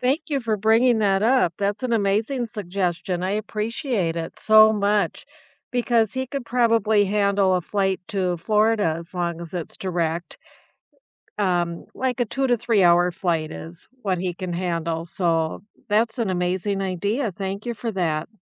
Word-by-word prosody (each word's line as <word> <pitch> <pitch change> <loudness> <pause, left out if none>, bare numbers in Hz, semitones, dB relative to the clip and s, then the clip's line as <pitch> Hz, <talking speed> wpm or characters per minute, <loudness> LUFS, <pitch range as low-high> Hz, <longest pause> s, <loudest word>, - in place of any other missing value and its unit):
Thank 280 +6 0
you 280 -2 +1
for 225 -3 -1
bringing 225 +3 +3
that 195 -1 +2
up. 235 -6 +3
That's 200 +3 -1
an 250 -2 -1
amazing 225 +4 +1
suggestion. 180 -4 -3
I 185 +1 -1
appreciate 215 - -2
it 165 -1 -5
so 215 0 +7
much 205 -1 0 0.4
because 235 -3 +1
he 260 0 -2
could 270 -1 -5
probably 225 -3 +3
handle 200 -1 +2
a - - 0
flight 190 +1 -1
to 180 -3 -1
Florida 210 -2 +2
as 170 +1 -11
long 170 -2 -2
as 170 - -9
it's 175 -3 -5
direct. 170 -2 -3 1.0
Um, 175 -3 0
like 255 -1 -1
a 245 - +2
2 270 +5 -1
to 245 -2 +3
three-hour 180 -6 +4
flight 170 -3 -1
is 165 +2 -10 0.2
what 185 -3 0
he 180 -1 -2
can 185 -1 -5
handle. 170 -2 -2
So 165 -2 -1 0.3
that's 225 +3 +1
an 225 -4 0
amazing 185 +2 -1
idea. 200 +6 -1
Thank 195 +3 -5
you 240 - -2
for 230 +1 -4
that. 165 -4 -1
200 Hz, 165 wpm, -23 LUFS, 175-225 Hz, 1.0 s, so